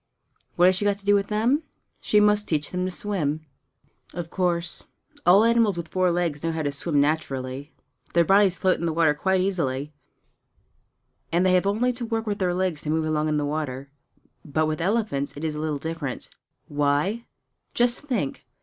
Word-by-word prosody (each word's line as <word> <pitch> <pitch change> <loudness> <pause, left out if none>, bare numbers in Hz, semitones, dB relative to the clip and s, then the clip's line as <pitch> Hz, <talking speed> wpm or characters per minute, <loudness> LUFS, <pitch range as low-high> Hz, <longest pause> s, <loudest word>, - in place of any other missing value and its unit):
What 175 - +5
has 185 +1 +5
she 205 - -1
got 200 -1 +2
to 200 - -17
do 205 0 +5
to 200 - -11
them? 230 +8 +1 0.4
She 210 - +3
must 210 0 +3
teach 150 -2 -1
them 180 0 -1
to - - -1
swim! 160 -6 -2 0.7
Of 175 -2 -5
course 175 -2 -1 0.4
all 195 +4 +7
animals 230 -4 +3
with 170 -1 -5
four 185 -1 +2
legs 170 -4 -1
know 165 - -1
how 160 -1 -2
to 145 - 0
swim 145 +1 0
naturally; 140 -2 -1 0.4
their 170 -1 +5
bodies 195 0 +4
float 185 -1 +2
in 170 - -1
the 160 - -1
water 160 -2 +3
quite 190 +5 +1
easily, 150 -7 -1 1.4
and 175 +2 +2
they 185 - +4
have 185 +1 +3
only 235 +5 +1
to 240 0 -5
work 225 -1 -2
their 180 -2 +1
legs 180 -4 -1
to 150 - -4
move 160 0 +1
along 155 0 0
in 150 - +1
the 145 - 0
water. 140 -2 -4 0.5
But 155 +1 0
with 155 +1 -2
elephants 175 -9 -1
it 145 - -7
is 155 -1 -1
a 150 - -5
little 155 -1 -1
different. 160 -3 -5 0.4
Why? 145 +10 0 0.5
Just 240 0 +2
think! 245 - -3
170 Hz, 190 wpm, -25 LUFS, 150-200 Hz, 1.4 s, all